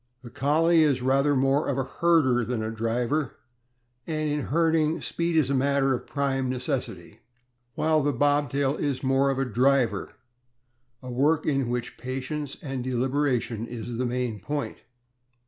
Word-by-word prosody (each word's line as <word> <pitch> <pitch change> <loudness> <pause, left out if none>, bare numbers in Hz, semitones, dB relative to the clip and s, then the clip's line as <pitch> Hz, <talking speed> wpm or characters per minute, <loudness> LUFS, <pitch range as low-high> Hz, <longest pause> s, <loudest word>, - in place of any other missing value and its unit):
The 120 - -10
CoDie 160 +4 +3
is 140 -5 +2
rather 135 +2 +3
more 135 +3 +2
of 140 - -1
a 135 - +1
herder 135 -4 +2
than 115 -1 -2
a 110 - -3
driver, 120 +5 -1 0.7
and 155 -1 -1
in 150 -1 -2
herding 160 0 +2
speed 170 -1 -1
is 140 -4 +2
a - - +2
matter 135 0 +2
of 125 - -4
prime 135 -2 -1
necessity; 125 0 -4 0.6
while 155 -1 +2
the 145 +1 +1
Bobtail 145 +1 +1
is 140 -3 -2
rather - - -1
more 135 +1 +3
of 135 - -1
a 135 - 0
driver, 125 -3 +1 0.9
a 130 - -6
work 145 +5 +2
in 135 -4 0
which 120 -1 -3
patience 135 +3 -4
and 135 -4 -4
deliberation 125 -2 -1
is 120 -1 -7
a 120 +1 -2
main 120 -3 -2
point. 145 +8 -4
135 Hz, 160 wpm, -26 LUFS, 125-145 Hz, 0.9 s, CoDie